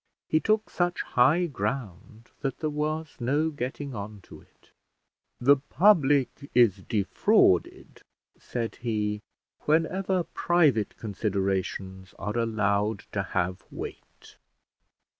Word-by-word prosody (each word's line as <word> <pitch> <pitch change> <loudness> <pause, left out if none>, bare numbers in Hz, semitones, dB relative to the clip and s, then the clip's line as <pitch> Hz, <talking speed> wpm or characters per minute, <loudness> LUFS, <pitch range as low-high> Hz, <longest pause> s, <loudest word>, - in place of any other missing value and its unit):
He 155 - +3
took 215 +4 0
such 175 0 0
high 145 +9 +3
ground 115 - -5
that 135 -2 -3
there 155 -2 -2
was 155 +1 -3
no 145 +6 +1
getting 140 0 -5
on 105 -1 -7
to - - -14
it. - - -28 0.7
"The 140 +3 +5
public 145 -4 +2
is 115 -6 +5
defrauded," 105 - +1 0.3
said 115 -2 -5
he, 105 -3 -2 0.4
"whenever 180 +4 +1
private 155 -12 +1
considerations 95 -2 -3
are 105 +1 -4
allowed 105 -2 0
to 100 - -1
have 95 -1 -2
weight." - - -10
120 Hz, 105 wpm, -27 LUFS, 105-155 Hz, 0.7 s, The